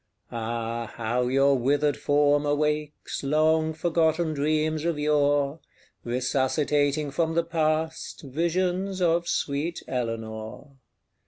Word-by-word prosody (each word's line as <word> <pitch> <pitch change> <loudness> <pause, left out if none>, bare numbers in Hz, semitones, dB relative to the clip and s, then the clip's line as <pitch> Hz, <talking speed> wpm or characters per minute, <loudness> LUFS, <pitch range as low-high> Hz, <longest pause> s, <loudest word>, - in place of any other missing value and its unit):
Ah, 115 0 -3
how 120 +2 -1
your 135 +2 +4
withered 145 +3 +1
form 145 0 +2
awakes 150 0 -1
Long 155 +2 +2
forgotten 160 0 +1
dreams 155 +1 0
of 170 -2 0
yore 145 0 +1 0.4
Resuscitating 140 +4 0
from 160 +2 0
the 170 - +3
past 160 -1 -1
Visions 180 +6 -1
of 170 -1 +2
sweet 150 +4 -2
Eleanor! 115 +2 -5
150 Hz, 100 wpm, -26 LUFS, 135-160 Hz, 0.4 s, your